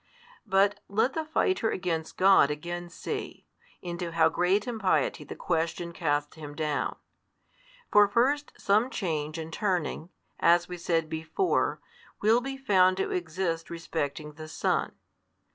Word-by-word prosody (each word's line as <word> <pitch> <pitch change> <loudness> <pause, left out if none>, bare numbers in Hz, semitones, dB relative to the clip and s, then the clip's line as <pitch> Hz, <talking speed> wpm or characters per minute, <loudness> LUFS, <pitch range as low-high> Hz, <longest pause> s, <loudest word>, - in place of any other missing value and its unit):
But 200 +1 +3
let 220 +6 +1
the 320 - -2
fighter 310 -4 +1
against 170 -5 -3
God 190 -6 +6
again 175 +4 -5
see, 415 - -6 0.4
into 175 -1 -4
how 165 -1 +4
great 190 +4 +1
impiety 240 - 0
the - - -8
question 170 0 -2
casts 150 -2 -1
him 145 -2 -8
down. 150 -2 -1 1.0
For 205 0 +7
first 270 +8 +1
some 215 +5 +2
change 155 - -3
and 160 0 -6
turning, 180 -5 -1 0.3
as 170 +1 +4
we 180 - -6
said 165 -2 0
before, 160 - 0 0.4
will 225 +3 +4
be 270 +1 -5
found 185 -8 +4
to - - -1
exist 165 -1 -2
respecting 155 -3 -4
the 155 +1 -9
Son. 155 - -1
175 Hz, 135 wpm, -28 LUFS, 160-205 Hz, 1.0 s, For